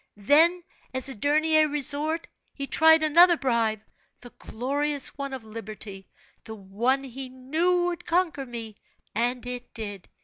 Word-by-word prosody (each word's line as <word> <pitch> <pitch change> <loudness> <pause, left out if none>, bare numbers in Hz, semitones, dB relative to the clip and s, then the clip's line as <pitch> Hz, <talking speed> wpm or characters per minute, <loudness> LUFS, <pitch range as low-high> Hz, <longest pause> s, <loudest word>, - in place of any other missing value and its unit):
Then 320 - +4 0.3
as 260 +1 -1
a - - -5
dernier 310 +6 +3
resort, 295 +3 -2 0.3
he 275 - -4
tried 320 +2 +5
another 340 +3 +6
bribe 230 -6 0 0.4
the 245 - -12
glorious 280 +4 -2
one 280 -1 -5
of 260 -3 -6
liberty, 215 -3 -9 0.3
the 220 - -8
one 225 +7 -1
he 265 0 -7
knew 315 +8 0
would 350 -1 -3
conquer 330 -6 0
me, 225 -3 -7 0.4
and 240 +3 -1
it 245 0 -6
did. 205 -5 -7
270 Hz, 140 wpm, -26 LUFS, 230-310 Hz, 0.4 s, another